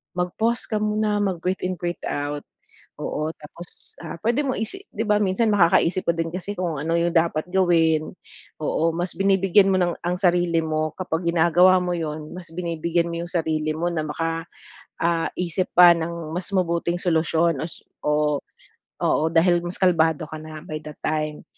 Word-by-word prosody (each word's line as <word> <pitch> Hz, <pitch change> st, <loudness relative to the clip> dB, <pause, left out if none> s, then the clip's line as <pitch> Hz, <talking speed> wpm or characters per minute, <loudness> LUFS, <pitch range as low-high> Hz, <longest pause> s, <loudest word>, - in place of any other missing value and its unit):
mag-pause 220 Hz, +7 st, -1 dB
ka 215 Hz, -, 0 dB
muna, 210 Hz, 0 st, +1 dB
mag-breath 185 Hz, -1 st, -2 dB
in, 185 Hz, -, -1 dB
breathe 175 Hz, 0 st, -3 dB
out. 145 Hz, 0 st, -3 dB, 0.6 s
Oo, 155 Hz, +1 st, -2 dB
tapos, 165 Hz, +3 st, -12 dB
ah, 160 Hz, -, -6 dB
puwede 240 Hz, +6 st, +1 dB
mo 270 Hz, -, 0 dB
isi 245 Hz, -, -4 dB
'di 220 Hz, -, -2 dB
ba 210 Hz, -, +4 dB
minsan 200 Hz, +3 st, +1 dB
makakaisip 185 Hz, -1 st, +3 dB
ka 170 Hz, -, +4 dB
din 165 Hz, 0 st, -1 dB
kasi 195 Hz, +3 st, -4 dB
kung 170 Hz, -3 st, -1 dB
ano 165 Hz, +3 st, -1 dB
yung 170 Hz, 0 st, 0 dB
dapat 165 Hz, 0 st, +2 dB
gawin. 165 Hz, -4 st, +2 dB, 0.5 s
Oo, 165 Hz, +2 st, +1 dB
mas 175 Hz, 0 st, -3 dB
binibigyan 195 Hz, 0 st, +4 dB
mo -, -, +3 dB
ng 175 Hz, -1 st, +1 dB
ang 180 Hz, +1 st, 0 dB
sarili 175 Hz, -3 st, +2 dB
mo 155 Hz, 0 st, -1 dB
kapag 175 Hz, -2 st, -3 dB
ginagawa 175 Hz, +2 st, +5 dB
mo 180 Hz, 0 st, -1 dB
'yun, 155 Hz, -1 st, -5 dB
mas 175 Hz, -2 st, -9 dB
binibigyan 170 Hz, 0 st, -1 dB
mo 170 Hz, 0 st, -3 dB
yung 175 Hz, -, -10 dB
sarili 155 Hz, -3 st, 0 dB
mo 165 Hz, +2 st, -2 dB
na 160 Hz, -2 st, -2 dB
baka, 165 Hz, +2 st, -2 dB, 0.6 s
ah, 165 Hz, -1 st, +1 dB
isip 180 Hz, +1 st, -1 dB
pa 175 Hz, 0 st, +9 dB
ng 165 Hz, -1 st, -4 dB
mas 180 Hz, 0 st, -4 dB
mabuting 170 Hz, -1 st, 0 dB
solusyon 165 Hz, -3 st, +1 dB
o -, -, -2 dB
su -, -, -13 dB, 0.2 s
o, 150 Hz, -1 st, +2 dB, 0.6 s
oo, 155 Hz, -, +2 dB
dahil 175 Hz, +1 st, +4 dB
mas 175 Hz, +1 st, -4 dB
kalmado 165 Hz, -4 st, +3 dB
ka 155 Hz, -, -7 dB
na 155 Hz, 0 st, -9 dB
by 155 Hz, -, -5 dB
that 150 Hz, -1 st, -9 dB
time. 155 Hz, -1 st, -2 dB
170 Hz, 180 wpm, -23 LUFS, 160-185 Hz, 0.6 s, pa